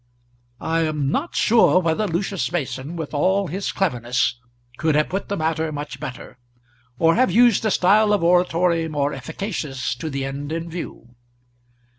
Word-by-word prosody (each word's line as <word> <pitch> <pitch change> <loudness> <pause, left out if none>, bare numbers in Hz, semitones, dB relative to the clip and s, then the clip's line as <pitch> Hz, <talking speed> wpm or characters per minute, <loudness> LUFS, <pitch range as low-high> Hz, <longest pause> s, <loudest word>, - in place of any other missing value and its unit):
I 165 0 -1
am 150 -4 0
not 315 - -2
sure 225 -4 +4
whether 175 +4 0
Lucius 185 +1 -2
Mason, 155 -1 -3
with 160 -3 -5
all 190 +7 +2
his 190 +4 -3
cleverness, 125 -8 0 0.4
could 155 -1 +1
have 150 0 +2
put 195 +2 -3
the 200 - -1
matter 160 0 -1
much 145 -2 -6
better, 130 -3 -8 0.6
or 165 +3 +4
have 255 +5 +3
used 240 -2 +4
a - - +3
style 210 +3 +4
of 205 -4 +2
oratory 175 -1 +2
more 145 -2 -1
efficacious 135 -2 -4
to 155 - -4
the 135 -1 -3
end 140 +2 -5
in 165 +1 -4
view. 160 -8 -8
165 Hz, 160 wpm, -22 LUFS, 145-190 Hz, 0.6 s, sure